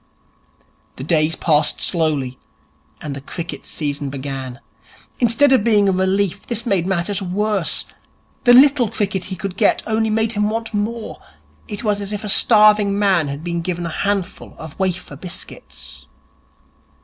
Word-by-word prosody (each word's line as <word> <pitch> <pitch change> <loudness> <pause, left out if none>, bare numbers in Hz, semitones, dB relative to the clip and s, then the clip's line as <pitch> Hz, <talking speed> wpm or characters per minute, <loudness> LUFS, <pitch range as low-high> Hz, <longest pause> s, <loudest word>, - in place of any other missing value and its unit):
The 130 - -7
days 155 +1 +1
passed 150 -2 +1
slowly, 150 -7 -1 0.6
and 145 -2 -5
the 140 - -7
cricket 170 +4 -6
season 145 -2 -3
began. 135 -2 -6 0.6
Instead 245 +4 +3
of 260 -6 +4
being 210 -3 +3
a - - +4
relief, 190 0 0
this 235 -1 -2
made 190 -6 +1
matters 190 +2 -1
worse. 195 0 -1 0.6
The 245 - +7
little 265 -2 +6
cricket 200 -4 -2
he 190 - -5
could 185 0 -5
get - - +2
only 220 0 0
made 220 +1 +1
him 210 -1 0
want 225 +1 -4
more. 215 +2 -4 0.5
It 205 +1 -6
was 205 -2 0
as 200 0 -6
if 210 0 -4
a 210 - -4
starving 210 -2 +5
man 190 -6 +2
had 140 +2 -6
been 170 -1 -2
given 175 0 -3
a - - -3
handful 195 +2 -3
of 160 -2 -9
wafer 185 -5 -2
biscuits. 180 - -10
195 Hz, 155 wpm, -19 LUFS, 165-215 Hz, 0.6 s, The